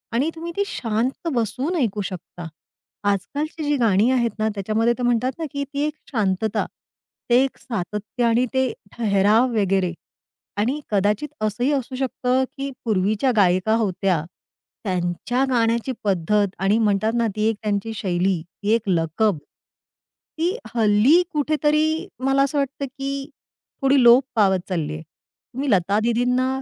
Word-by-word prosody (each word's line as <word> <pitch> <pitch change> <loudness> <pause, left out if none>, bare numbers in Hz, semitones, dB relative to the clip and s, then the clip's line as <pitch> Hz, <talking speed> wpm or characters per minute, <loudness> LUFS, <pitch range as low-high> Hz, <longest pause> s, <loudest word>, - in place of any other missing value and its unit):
आणि 275 +7 +2
तुम्ही 335 +1 -6
ती 405 - +3
शांत 235 +7 -2
बसून 250 - -1
ऐकू 215 -8 0
शकता. 175 -3 -7 0.6
आजकालची 290 - -3
जी 295 0 +1
गाणी 225 -1 +3
आहेत 235 -3 +2
ना 215 - +1
त्याच्यामध्ये 220 +4 +1
ते 250 - -4
म्हणतात 245 +1 +2
ना 325 - -2
की 280 0 -2
ती 285 - -1
एक 305 - -3 0.2
शांतता, 215 -1 0 0.6
ते 245 +2 +5
एक 270 - -3
सातत्य 210 +2 -4
आणि 235 +2 +3
ते 260 -2 +1 0.2
ठहराव 215 +2 +3
वगैरे 190 -3 +1 0.6
आणि 250 +8 0
कदाचित 210 +8 +1
असंही 215 +6 0
असू 260 -1 -2
शकतं 260 0 0
की 275 0 -3 0.2
पूर्वीच्या 215 +4 +1
गायिका 190 +2 +3
होत्या 190 -6 0 0.6
त्यांच्या 185 +7 -1
गाण्याची 235 +1 +1
पद्धत 200 +1 +1
आणि 195 +3 +2
म्हणतात 215 +1 +1
ना 235 - +2
ती 215 +1 +1
एक 225 - -1
त्यांची 210 +1 -1
शैली, 185 -3 0 0.2
एक 220 +2 +2
लकब, 170 +3 +1 1.0
ती 350 +6 0 0.2
हल्ली 225 +9 +5
कुठेतरी 310 +3 +1
मला 270 +1 +2
असं 280 +1 -1
वाटतं 280 0 -1
की 275 +1 -5 0.5
थोडी 270 0 +4
लोप 240 +3 +7
पावत 190 -3 +3
चालली 155 -4 -2
आहे. 155 - -6 0.5
तुम्ही 270 +2 -2
लता 200 +2 +2
दीदींना 250 +2 +1
225 Hz, 140 wpm, -22 LUFS, 200-265 Hz, 1.0 s, लोप